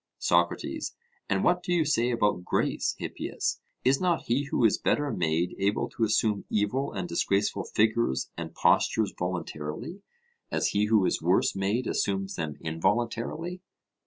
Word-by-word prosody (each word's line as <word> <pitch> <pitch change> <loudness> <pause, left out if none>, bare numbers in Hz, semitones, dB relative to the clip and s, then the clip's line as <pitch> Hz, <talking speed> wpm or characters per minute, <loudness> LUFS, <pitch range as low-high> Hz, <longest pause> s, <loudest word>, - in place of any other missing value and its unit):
SOCRATES: - - 0 0.3
And 95 -1 +1
what 180 0 +3
do 180 - -4
you 170 -3 +3
say 125 -5 +2
about 105 -6 +1
grace, - - 0
Hippias? - - -3 0.3
Is 135 +2 +3
not 175 -3 +1
he 130 +5 0
who 130 -3 +1
is 110 - +3
better 145 -1 +1
made 85 -3 0
able 100 +2 +1
to 115 - -3
assume 105 -1 +2
evil 110 +7 0
and 180 - -4
disgraceful 100 - 0
figures 110 - +1
and - - -6
postures 110 -3 +2
voluntarily, 90 - -4 0.5
as - - +1
he 105 +1 +2
who 105 -3 +3
is - - 0
worse - - +2
made 100 +6 0
assumes 95 -2 -1
them 80 -3 -3
involuntarily? 115 - -1
110 Hz, 150 wpm, -28 LUFS, 95-130 Hz, 0.5 s, what